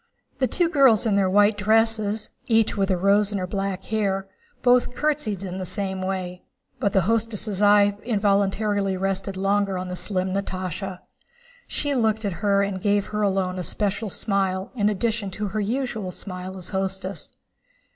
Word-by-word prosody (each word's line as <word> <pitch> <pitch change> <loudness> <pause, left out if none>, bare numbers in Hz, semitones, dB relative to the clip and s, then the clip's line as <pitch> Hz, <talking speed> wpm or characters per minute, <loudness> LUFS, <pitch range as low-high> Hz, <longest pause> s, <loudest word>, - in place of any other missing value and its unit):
The 260 - +2
two 350 +5 +2
girls 270 - +4
in 215 -3 +2
their 195 -2 +3
white 205 +2 +4
dresses, 220 0 +1 0.2
each 225 -2 +3
with 195 -1 0
a 185 - +2
rose 200 +3 +3
in 205 - -1
her 185 - -2
black 195 0 -3
hair, 195 -3 -1 0.4
both 245 0 +3
curtsied 280 -10 -1
in 185 0 -5
the - - -3
same 190 0 -3
way, 185 -1 -3 0.4
but 200 -6 +1
the 190 - +4
hostess' 215 0 0
eye 205 0 +5
involuntarily 200 -2 +1
rested 195 0 -2
longer 195 0 +1
on 180 0 -4
the 180 - -4
slim 185 -1 -1
Natásha. 185 -1 -4 0.7
She 290 -1 0
looked 220 -3 +1
at 200 - -1
her 200 -1 +3
and 195 -2 -3
gave 205 0 +2
her 210 0 -2
alone 190 -2 0
a - - -3
special 205 +3 -1
smile 190 -1 -1
in 210 -4 +1
addition 215 0 -1
to 210 -1 -2
her 215 +3 -2
usual 225 -2 -2
smile 185 0 -7
as 180 -2 -7
hostess. 190 -1 -3
200 Hz, 170 wpm, -24 LUFS, 190-215 Hz, 0.7 s, eye